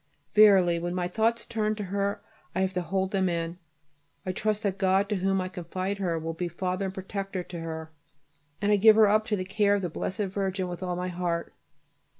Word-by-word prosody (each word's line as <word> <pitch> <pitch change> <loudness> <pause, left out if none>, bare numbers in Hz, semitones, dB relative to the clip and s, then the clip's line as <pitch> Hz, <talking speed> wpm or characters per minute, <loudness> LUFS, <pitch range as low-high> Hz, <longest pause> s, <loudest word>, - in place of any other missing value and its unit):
Verily 195 -5 +6
when 175 +1 -3
my 180 -1 0
thoughts 225 +5 0
turn 215 -1 -1
to 210 - -4
her 200 +1 -2 0.3
I 190 - +1
have 190 0 0
to 180 - 0
hold 190 +3 -1
them 190 -2 +1
in. 170 +1 -3 0.7
I 185 - -1
trust 215 +2 -1
that 195 -2 -1
God, 190 +1 +3
to 210 - 0
whom 195 +1 +1
I 185 - -2
confide 185 +2 -4
her, 175 -4 0
will 165 +1 -3
be 175 +2 -3
Father 185 +3 -2
and 190 - -4
Protector 195 -1 -4
to 175 -1 -8
her, 160 -1 -6 0.7
and 205 +1 +1
I 205 - +5
give 215 +2 +7
her 220 -1 +7
up 215 +1 +3
to 220 -3 0
the 185 -2 -3
care 205 +1 +2
of 200 - -2
the 175 - -2
Blessed 185 +5 -3
Virgin 190 -1 -1
with 175 0 -6
all 180 -1 -2
my 180 +1 -3
heart. 175 -1 -2
190 Hz, 220 wpm, -27 LUFS, 180-200 Hz, 0.7 s, give